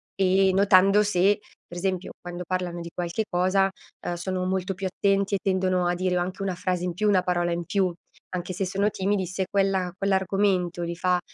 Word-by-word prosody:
e 190 0 +3
notando 195 +1 +5
se, 205 +1 +2 0.3
per 175 - -9
esempio, 185 0 -2
quando 175 0 -6
parlano 180 -2 -2
di 170 - -7
qualche 175 +5 -2
cosa, 185 +2 +2 0.4
uhm, 175 - 0
sono 185 +1 -3
molto 190 +1 -1
più 190 +1 -3
attenti 195 +1 +1
e 195 - -1
tendono 185 -1 +1
a 175 - +2
dire 185 0 0
o 175 - +1
anche 185 +2 -4
una 190 -2 -1
frase 180 0 -2
in 180 - -2
più, 210 +5 0
una 190 -3 +4
parola 175 -2 0
in 170 0 -2
più, 190 0 +1 0.4
anche 180 +1 -3
se 190 +2 -2
sono 195 +3 +1
timidi 195 -1 -1
se 190 +1 -2
quella 195 -2 +1
quell'argomento 190 -2 +1
li 170 0 -3
fa 180 0 +1
185 Hz, 200 wpm, -25 LUFS, 180-195 Hz, 0.4 s, notando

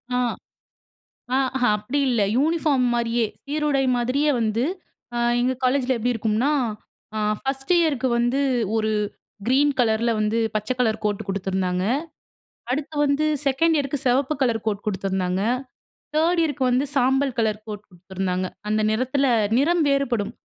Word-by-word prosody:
ஆ - - +2 1.2
ஆ - - +4 0.4
அப்படி 245 +8 -2
இல்ல, 235 -4 +1 0.2
யூனிஃபார்ம் 295 -3 +2
மாரியே 235 0 +1 0.2
சீருடை 290 -1 0
மாதிரியே 270 +5 +1
வந்து 225 +2 0 0.8
எங்கள் 255 +1 0
காலேஜில 260 0 +2
எப்படி 245 +2 0
இருக்கும்னா, 225 +4 0 0.9
1 270 +3 -3
இயருக்கு 285 -6 +1
வந்து 240 +3 +1 0.4
ஒரு 220 -1 +1 0.6
கிரீன் 280 +3 +4
கலர்ல 230 0 +2
வந்து, 215 +2 +1 0.2
பச்சை 215 +4 0
கலர் 220 -3 +1
கோட் 210 +1 -1
கொடுத்துருந்தாங்க. 190 -2 -1 0.9
அடுத்து 290 +4 -2
வந்து 285 +2 +1 0.2
2 315 +5 +3
இயருக்கு 280 -1 -1
சிவப்பு 265 +4 +2
கலர் 230 -4 0
கோட் 205 -1 -2
குடுத்துருந்தாங்க. 190 -2 -1 0.7
3 335 +2 +3
இயருக்கு 290 -4 -1
வந்து 250 +3 +2
சாம்பல் 265 0 +2
கலர் 215 -1 0
கோட் 210 -1 -7
கொடுத்துருந்தாங்க. 185 0 -3 0.2
அந்த 215 0 +1
நிறத்தில 260 +5 +1 0.3
நிறம் 330 +5 +3
வேறுபடும் 270 -7 0
245 Hz, 125 wpm, -23 LUFS, 215-280 Hz, 1.2 s, ஆ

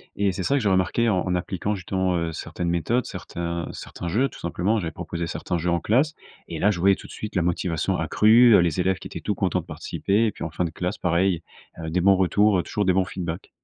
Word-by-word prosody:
et 100 -1 +1
c'est 95 0 -4
ça 140 - +1
que - - +3
j'ai 105 - +2
remarqué 95 +5 +2
en 95 -3 0
appliquant 90 +3 -2
justement, 95 -1 -1
heu, 85 -1 -1
certaines 85 +2 -4
méthodes, 85 +9 0
certains 85 0 -5
certains 85 - -7
jeux, 120 +10 +2
tout - - -13
simplement. 90 +6 0
J'avais 85 -4 -3
proposé 85 +1 -5
certains 90 +1 -3
jeux 85 +1 -1
en 85 - +2
classe 130 - +2 0.3
et 80 - -5
là, 105 - +3
je 100 -5 -1
voyais, 95 +2 +5
tout - - -12
de - - -13
suite, 105 -1 -7
la 90 - +2
motivation 85 -1 0
accrue, 110 -1 +6
les 85 -1 0
élèves 95 +1 +1
qui - - -8
étaient - - -8
tout - - -1
contents - - 0
de - - -18
participer. 105 +4 -1
Et - - 0
puis, - - -8
en 80 - -4
fin 85 +3 -1
de - - -2
classe, 90 +4 -3
pareil, 90 0 +1 0.4
heu, 80 -1 -4
des 90 +3 0
bons 100 +2 +5
retours, 95 +1 +3
toujours 105 -2 -2
des 95 - +3
bons 95 0 +2
feedbacks. 90 -2 -5
90 Hz, 245 wpm, -24 LUFS, 85-100 Hz, 0.4 s, accrue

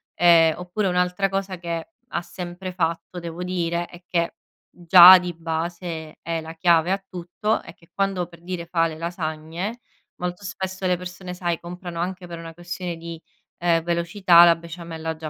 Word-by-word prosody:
ehm, 165 -2 +6
oppure 180 +3 -2
un'altra 180 +2 +1
cosa 195 -1 -3
che 170 -1 -4 0.2
ha 175 - -3
sempre 180 +1 -7
fatto 170 0 -2
devo 170 +1 -6
dire 175 -1 -1
e 175 0 -14
che, 170 -1 0 0.4
già 180 +1 +10
di 180 -1 -4
base 165 0 -4
è 165 0 -2
la 160 +1 -9
chiave 170 0 +3
a 195 0 -1
tutto, 180 +5 -2
è - - -12
che 165 - -24
quando 195 -2 0
per 170 -1 -17
dire 175 -1 -5
fa 165 -1 +1
le 160 -1 -7
lasagne 170 +5 -4 0.4
molto 180 +2 -5
spesso 190 -1 -4
le 180 -1 +2
persone 180 0 -8
sai, 175 -2 -2
comprano 175 0 -7
anche 180 +1 -3
per 170 -1 -7
una 165 0 -9
questione 175 0 -5
di, 165 0 -8 0.4
ehm, 170 -1 +2
velocità 170 +1 +5
la 170 -1 +6
besciamella 165 -1 -6
già 160 0 -6
175 Hz, 175 wpm, -23 LUFS, 165-180 Hz, 0.4 s, già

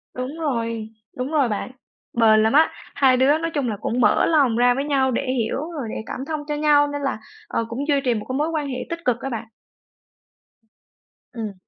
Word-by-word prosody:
Đúng 255 +5 -5
rồi, 230 -7 -2 0.3
đúng 255 +4 -3
rồi 280 -6 +2
bạn. 210 +4 -3 0.4
Bền 220 -2 +5
lắm 220 - +2
á, 315 +2 +6 0.3
hai 265 -2 +4
đứa 280 +4 +4
nói 330 0 -3
chung 275 -5 0
là 210 - -3
cũng 245 +2 -1
mở 210 - +4
lòng 280 -8 +3
ra 245 0 +5
với 275 +3 -2
nhau 265 -3 +2
để - - 0
hiểu 235 -2 -1
rồi 280 -8 -5
để - - -5
cảm - - -6
thông 310 -2 -2
cho 295 - -1
nhau 295 -1 +4
nên 290 0 -4
là, 270 -5 -2 0.3
ờ, 230 - -1
cũng 275 +6 -4
duy 285 -2 +2
trì 245 - +3
một 215 - -4
cái 260 - -2
mối 305 +2 0
quan 305 -3 -2
hệ 255 -2 -4
tích 335 0 -4
cực 240 -2 +1
á 270 - -3
bạn. 225 -2 -5 1.9
Ừm. 220 -4 -5
260 Hz, 220 wpm, -22 LUFS, 230-290 Hz, 1.9 s, á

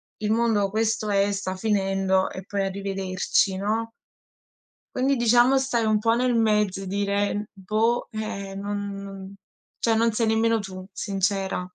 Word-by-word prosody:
il 215 0 -2
mondo 225 -3 +2
questo 220 +1 0
è, 200 0 +2
sta 190 -1 -3
finendo 195 -2 +1
e 190 - -8
poi 200 -1 -2
arrivederci, 195 0 0
no? 220 +3 -1 1.1
Quindi 265 +1 +2
diciamo, 240 +3 +5
stai 265 -3 0
un 215 -1 +2
po' 225 +1 +2
nel 250 0 +1
mezzo 210 -4 +2
e 190 - -7
dire: 200 +1 -1
"Boh", 215 +5 0
eh, 200 -3 -5
non 205 0 -4
non 195 0 -9 0.4
cioè 230 - +1
non 230 0 +2
sei 230 +1 +1
nemmeno 225 +1 +2
tu, 185 -1 -8
sincera. 195 0 -1
205 Hz, 150 wpm, -25 LUFS, 195-225 Hz, 1.1 s, diciamo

